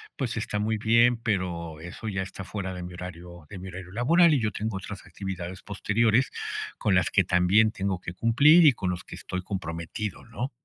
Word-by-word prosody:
pues, - - -3
está 105 - -2
muy 110 +1 0
bien, 115 +3 +4
pero 90 -8 -2
eso 90 +6 -8
ya 95 -3 -2
está 95 +1 -7
fuera 95 -2 -4
de 90 -1 -6
mi 90 0 -7
horario 85 -1 -9
de 95 - -8
mi 95 - -8
horario 90 0 -8
laboral, 160 - +4
y 145 - +3
yo 110 -2 0
tengo 105 -1 -3
otras 95 +1 -8
actividades 95 -2 -6
posteriores, 110 +4 +1 0.5
con 100 - +1
las 90 -2 +3
que 95 - +3
también 95 +5 +4
tengo 95 -3 -2
que 85 - -7
cumplir, 140 - +6
y 150 - +9
con 95 -5 -3
los 90 0 -5
que - - -10
estoy 90 - -5
comprometido, 90 +1 -5
¿no? 120 +3 -4
95 Hz, 205 wpm, -27 LUFS, 90-110 Hz, 0.5 s, y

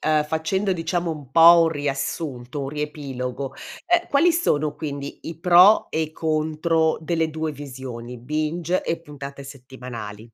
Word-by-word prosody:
facendo 160 +6 0
diciamo 175 0 -1
un 145 -5 -8
po' 170 +3 +8
un - - +2
riassunto, 140 -2 -3
un 135 - -4
riepilogo, 140 -3 -5 0.3
ehm, 350 -1 +2
quali 320 +5 +4
sono 155 - +1
quindi 145 -1 -6
i 165 - -7
pro 180 +5 +6
e 160 - -1
i 155 -1 -2
contro 160 +1 0
delle 160 0 0
2 160 0 -3
visioni, 125 -4 -8
binge 155 +7 -2
e 165 - -2
puntate 140 -3 -9
settimanali? 125 -6 -9
155 Hz, 140 wpm, -23 LUFS, 140-165 Hz, 0.3 s, po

